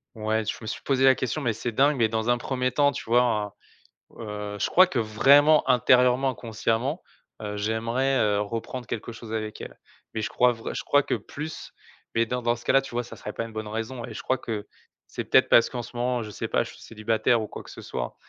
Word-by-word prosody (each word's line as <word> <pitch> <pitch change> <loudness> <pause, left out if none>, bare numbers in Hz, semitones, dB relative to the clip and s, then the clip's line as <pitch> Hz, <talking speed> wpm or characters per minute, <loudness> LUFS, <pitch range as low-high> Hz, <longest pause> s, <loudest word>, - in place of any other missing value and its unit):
Ouais. 110 0 -1
Je 110 - -3
me 110 - -8
suis - - -4
posé 135 -1 +2
la 130 0 +7
question 130 +5 -2
mais 120 -5 0
c'est 115 +3 -4
dingue, 140 +6 +3
mais 115 -3 +3
dans 110 +1 -1
un 120 - +4
1er 130 +1 -1
temps, 145 +3 +3
tu 140 - -6
vois, 120 +2 +4
en 105 -4 -1 0.7
heu, 105 -1 -5
je - - 0
crois 185 - +7
que, 135 - -1
vraiment, 140 +8 +5
intérieurement, 125 +2 +4
inconsciemment, 120 - -2 0.4
heu, 105 -1 -4
j'aimerais, 115 +6 0
heu, 105 -1 +2
reprendre 115 +4 -5
quelque 115 0 -5
chose 115 -1 -9
avec 110 -1 -4
elle. - - -9 0.3
Mais, 110 - -2
je - - -2
crois 125 0 +3
vrai 115 -1 -6
je - - -3
crois 145 - +4
que - - -1
plus, 155 +2 -7 0.4
mais 115 0 +2
dans 125 +2 -2
dans 120 0 +2
ce 120 - -13
cas-là, 135 0 +4
tu 135 - -10
vois, 120 0 -1
ça 120 - -11
serait 105 - -7
pas - - -3
une 115 - -11
bonne 110 -1 -5
raison 115 +3 -4
et - - -9
je - - -6
crois 130 - 0
que 110 -4 -5 0.4
c'est - - -5
peut-être - - +4
parce 115 - +6
qu'en 125 -2 -4
ce 120 +1 -10
moment, 125 0 0
je 110 - -6
sais 105 - -5
pas, - - +1
je - - -9
suis - - -16
célibataire 115 +1 0
ou 110 - -4
quoi - - -9
que - - -12
ce - - -10
soit, - - -5
115 Hz, 245 wpm, -26 LUFS, 110-130 Hz, 0.7 s, la